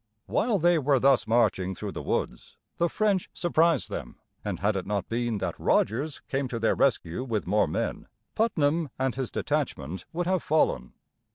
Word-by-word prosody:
While 220 0 +1
they 175 -1 +4
were 140 -2 +3
thus 130 -3 +4
marching 95 -5 +2
through - - -5
the - - -6
woods, - - -3 0.2
the 170 0 +2
French 205 -2 +1
surprised 165 -4 +2
them; - - -5 0.3
and - - -3
had 105 +1 +1
it 95 - -3
not 100 -1 -1
been 120 -1 -1
that - - -4
Rogers 135 +8 +1
came 135 0 -1
to 125 - -4
their 115 0 +2
rescue 115 -5 +1
with 115 -6 -2
more 105 +4 +2
men, - - -3 0.3
Putnam 160 -8 +1
and 130 -1 0
his 130 0 -3
detachment 85 +7 -2
would 175 +1 -2
have 185 -1 +1
fallen. 65 - +1
130 Hz, 175 wpm, -27 LUFS, 110-165 Hz, 0.3 s, they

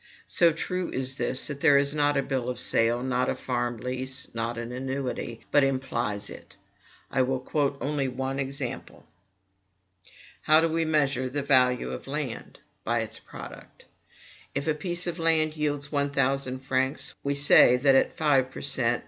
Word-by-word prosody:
So 170 -1 +4
true 180 +3 -3
is 130 0 -3
this, 130 - -2
that 140 -2 -5
there 145 -3 +6
is 140 +1 +1
not 145 -1 +2
a 140 - +1
bill 130 -3 -2
of 125 -1 -4
sale, 120 0 +2
not 130 -1 0
a - - -1
farm 120 -2 -2
lease, 130 +3 -4
not 115 +1 -3
an 120 0 -5
annuity, 130 -2 -4
but 145 - +5
implies 130 -6 -1
it. - - -11 0.6
I 130 - +2
will 130 0 0
quote 140 +1 -1
only 145 -1 -1
one 130 +1 -3
example. 135 -2 -5 1.4
How 155 +1 +5
do 165 - +2
we 165 0 0
measure 140 -5 +1
the 145 +2 -3
value 125 -3 +2
of - - -7
land? 140 -4 -5 0.2
By 115 0 0
its 110 0 -5
product. - - -12 0.7
If 140 0 -1
a 155 - +1
piece 175 +3 -2
of 175 -1 -4
land 160 -1 +2
yields 145 -2 -2
one 145 -1 0
thousand 135 -1 -1
francs, 130 +2 0
we 140 0 -1
say 140 -3 +7
that 135 +2 +4
at 135 - +2
five 140 -4 +2
per - - -9
cent. 120 -4 +2
135 Hz, 175 wpm, -26 LUFS, 125-145 Hz, 1.4 s, say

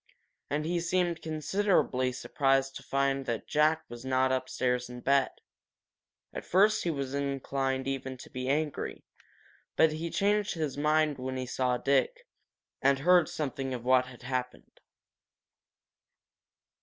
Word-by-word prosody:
And 150 +1 -1
he 175 +1 0
seemed 175 -1 0
considerably 155 -5 +1
surprised 135 +1 0
to - - -7
find 135 0 0
that 115 -2 -2
Jack 155 +2 +2
was 120 0 -9
not 130 0 +1
upstairs 125 -1 -1
in 125 0 -8
bed. 140 0 +3 1.0
At - - -5
first 205 +4 +3
he 175 - 0
was 140 -4 -3
inclined 135 -1 -2
even 130 -1 -3
to - - -12
be 130 0 -4
angry, 150 +1 -2 0.7
but 160 - +5
he 160 +2 -4
changed 205 +3 +1
his 155 -4 -2
mind 150 0 +2
when 130 0 -4
he 130 - -3
saw 125 0 0
Dick, 465 - +1 0.6
and 135 0 +4
heard 175 +3 +4
something 135 -3 -3
of 120 -1 -8
what 130 0 +4
had 125 -1 -13
happened. 125 0 -5
135 Hz, 140 wpm, -29 LUFS, 130-155 Hz, 1.0 s, but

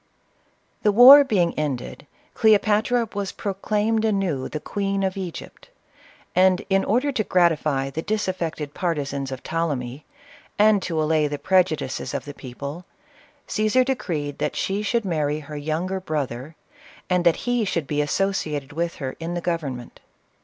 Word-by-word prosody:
The 210 - +3
war 260 +7 +10
being 185 -10 +1
ended, 140 -1 -4 0.3
Cleopatra 220 +2 +3
was 200 -1 -3
proclaimed 210 +2 -1
anew 195 -11 0
the 155 - -4
queen 195 +3 -2
of 190 -1 -1
Egypt; 185 -4 -8 0.7
and 185 0 +4
in 195 0 +3
order 255 +7 +1
to 225 -5 0
gratify 155 -7 +1
the 160 - -3
disaffected 175 -7 -3
partisans 140 -6 -2
of 130 - -6
Ptolemy, 145 -5 -3 0.5
and 210 -1 +5
to 165 -4 -2
allay 155 -1 +2
the 145 0 -4
preju 185 -1 +2
dices 130 -2 -5
of - - -4
the 145 - -7
people, 140 +6 -8 0.6
Caesar 215 +4 +2
decreed 165 - -3
that - - -1
she 195 +2 -1
should 230 +1 0
marry 155 -4 -1
her 150 +1 -9
younger 160 +6 -2
brother, 150 -4 -4 0.5
and 180 -1 +1
that 170 -2 +4
he 245 -2 +1
should 175 -6 -1
be 150 +1 -1
as 145 - -2
sociated 155 -8 -1
with 170 +2 -2
her 130 -2 -5
in 165 +2 -4
the - - -1
government. 150 -9 -4
170 Hz, 155 wpm, -23 LUFS, 150-200 Hz, 0.7 s, war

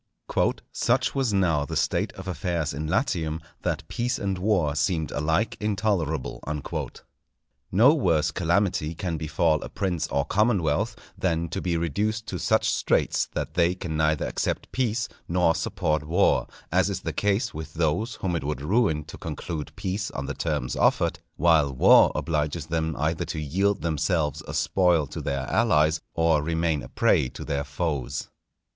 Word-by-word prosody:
_ - - +1
"Such 130 +2 +1
was 135 -4 +1
now 85 -7 +2
the 70 - -5
state - - 0
of - - -9
affairs 85 -3 -2
in 75 +3 -4
Latium, 85 - 0 0.2
that - - -2
peace 125 +2 -1
and 95 -2 -2
war 90 -7 +2
seemed 80 0 0
alike 80 +9 0
intolerable." 95 - -1 1.3
No 115 +10 +6
worse 85 - +2
calamity 85 -2 0
can 85 -1 -3
befall 75 0 +1
a - - -6
prince 90 -5 -2
or 70 +1 0
commonwealth 105 +1 +1 0.2
than 85 -2 -1
to - - -3
be 85 -2 0
reduced 105 +7 -1
to 90 - -4
such - - +2
straits - - +1
that - - -3
they 85 +1 +2
can 85 -4 -5
neither 75 -1 +1
accept - - -2
peace 115 -3 0 0.2
nor 85 -1 +3
support 80 -3 -1
war; 85 +6 +2 0.2
as - - +3
is - - -3
the - - -3
case 105 +4 0
with 80 +1 -7
those 85 +9 0
whom 90 -2 -2
it 80 - -2
would 70 -2 -3
ruin 90 -4 +2
to 75 - -11
conclude 75 -3 -5
peace 100 0 -3
on 65 - -5
the - - -3
terms 60 0 -2
offered, - - +2 0.2
while 80 -4 +4
war 65 - +6
obliges 75 -1 -1
them 80 -1 -1
either 80 +3 0
to 80 - -4
yield 95 +7 0
themselves 80 -2 0
a - - -5
spoil 90 -5 +3
to - - -7
their 70 0 -2
allies, 75 - +2
or 80 -2 +3
remain 80 -1 0
a - - -9
prey 65 - +2
to - - -8
their 70 0 -1
foes. 70 -2 -3
85 Hz, 165 wpm, -26 LUFS, 75-100 Hz, 1.3 s, No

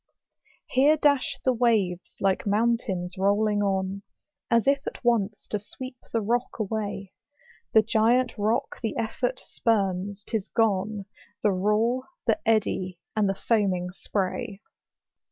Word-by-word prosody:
Here 290 +4 +5
dash 285 -3 +2
the 260 - +4
waves 215 -7 +1
like 195 +1 +1
mountains 200 -4 0
rolling 205 +1 +2
on, 195 0 -1 0.5
As 230 -1 +3
if 275 0 +2
at - - -6
once 220 -3 +1
to 210 - 0
sweep 255 +5 -9
the 230 - +1
rock 240 +4 -1
away: 205 -3 -3 0.6
The 220 - +7
giant 230 +3 +2
rock 220 +5 -1
the 225 -3 -2
effort 245 +3 -1
spurns,? 200 -3 0
tis 220 -4 -2
gone, 210 -2 +1 0.4
The 210 - +4
roar, 215 +7 +1 0.2
the - - +2
eddy, 185 -5 +1 0.2
and 210 -2 +2
the 195 - 0
foaming 190 -5 +1
spray. 195 +3 -3
215 Hz, 130 wpm, -26 LUFS, 195-235 Hz, 0.6 s, The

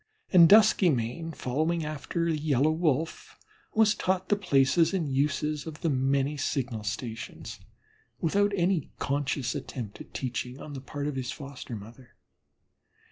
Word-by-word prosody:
And 170 -3 +8
Duskymane, 165 - +4
following 155 +6 -1
after 155 +2 -3
the 165 -1 +1
Yellow 150 0 +2
Wolf, 160 -1 -1 0.4
was 215 -1 +5
taught 185 0 -1
the 205 - +4
places 165 -1 +3
and 170 -5 -1
uses 145 +2 -1
of 155 -1 -8
the 165 - +1
many 135 +2 +1
signal 125 -5 -2
stations 110 +2 -6 0.6
without 200 +5 +2
any 175 -4 +1
conscious 140 -3 -1
attempt 110 -6 -6
at - - -12
teaching 125 0 -4
on 150 - -8
the 135 - -6
part 140 +2 -5
of 150 -2 -2
his 130 -1 -3
foster 140 -4 -8
mother. 115 +4 -12
145 Hz, 140 wpm, -28 LUFS, 130-165 Hz, 0.6 s, And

